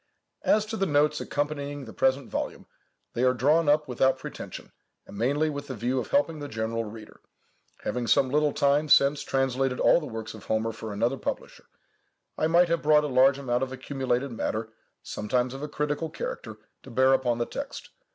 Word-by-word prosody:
As 215 0 +3
to 220 +1 -5
the 195 - +1
Notes 150 0 +2
accompanying 145 -1 -3
the 110 - -10
present 130 0 +1
volume, - - -4 0.5
they 120 - -1
are 130 0 +4
drawn 150 +6 +3
up 150 +1 +3
without 130 +1 +2
pretension, - - -8 0.3
and - - -12
mainly 140 +8 +1
with 145 -1 -4
the 130 - -5
view 125 +4 -1
of - - -4
helping 225 - +1
the 145 - -5
general 115 -1 -2
reader. 110 0 -11 0.6
Having 125 -1 -2
some 135 0 +3
little 150 +1 +3
time 145 +2 +2
since 140 +1 +5
translated 135 -1 0
all - - +5
the 150 - -7
works 110 -2 -6
of 110 -3 -12
Homer 110 +1 0
for 110 -1 -7
another 115 +6 0
publisher, - - -5 0.7
I 155 - +1
might 170 +2 +5
have 170 0 +1
brought 150 0 +5
a - - -1
large 135 +1 +4
amount 125 -3 -1
of 130 -1 -2
accumulated 130 0 -2
matter, 110 -1 -3 0.3
sometimes 125 +4 -1
of 135 - -7
a 150 - -4
critical 150 +2 -2
character, 110 -8 -6 0.2
to - - -13
bear 130 +2 +4
upon 125 -3 +1
the 120 - 0
text. 280 - -7
135 Hz, 190 wpm, -27 LUFS, 120-150 Hz, 0.7 s, since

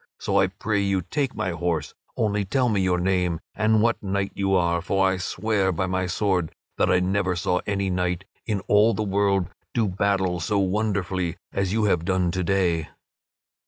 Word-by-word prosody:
So 100 0 +1
I 95 - +4
pray 100 +2 -1
you 100 -2 0
take 135 - -2
my 95 - -1
horse, 85 -4 -2 0.2
only 105 -1 +1
tell 125 +6 +1
me 100 -3 +1
your 90 -1 +2
name 90 -2 0
and 110 0 +2
what 115 0 +1
knight 100 0 -1
you 95 -1 +1
are; 85 -1 +2
for 95 +2 +2
I 95 0 +1
swear 95 +1 0
by 95 +2 -1
my 90 0 -1
sword 90 -3 0 0.3
that - - +3
I 90 - +4
never 95 0 0
saw 90 +1 0
any 100 -1 0
knight 90 0 -1 0.2
in 105 -4 -1
all 105 +3 +4
the 110 - -1
world 100 -2 +1 0.3
do 115 -3 +2
battle 95 -2 0
so 105 +4 0
wonderfully 95 -3 -1 0.2
as 95 -1 0
you 110 +1 +1
have 90 -5 +2
done 90 -1 +1
to 95 +1 -1
day." 85 -4 +1
95 Hz, 190 wpm, -24 LUFS, 90-100 Hz, 0.3 s, I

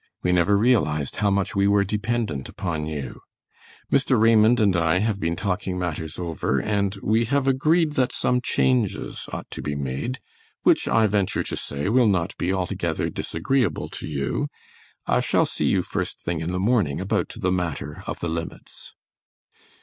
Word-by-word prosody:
We 90 - +2
never 90 +3 +3
realized 100 - +1
how 105 -2 +2
much 100 0 0
we 100 0 +3
were 100 0 +4
dependent 105 - -2
upon 80 -5 -3
you. 75 -5 -5 0.7
Mr. 130 -3 +3
Raymond 115 +1 +5
and 100 -4 +3
I 85 +1 +2
have 105 +1 0
been 85 -2 -1
talking 90 -1 -2
matters 80 -2 -3
over, 80 -6 -1
and 100 +3 0
we 110 +2 +2
have 140 +2 0
agreed 155 +5 +3
that 130 -3 +1
some 125 0 +1
changes 125 -4 0
ought - - -5
to - - -5
be 75 - -3
made, 70 - -3 0.4
which - - +4
I 110 -1 +4
venture 100 -2 +1
to - - -4
say 70 +3 -4
will 120 +2 +4
not 95 -3 0
be 90 - 0
altogether 95 -2 -1
disagreeable 125 - -1
to - - -7
you. 70 -3 -2 0.6
I - - +2
shall - - +2
see - - -2
you - - +2
first - - -3
thing 85 -2 -3
in 85 +2 -2
the 90 - -2
morning 100 - +1
about - - -1
the 90 - 0
matter 80 -5 -3
of - - -5
the 85 - -1
limits. 80 0 -7
100 Hz, 170 wpm, -24 LUFS, 85-115 Hz, 0.7 s, Raymond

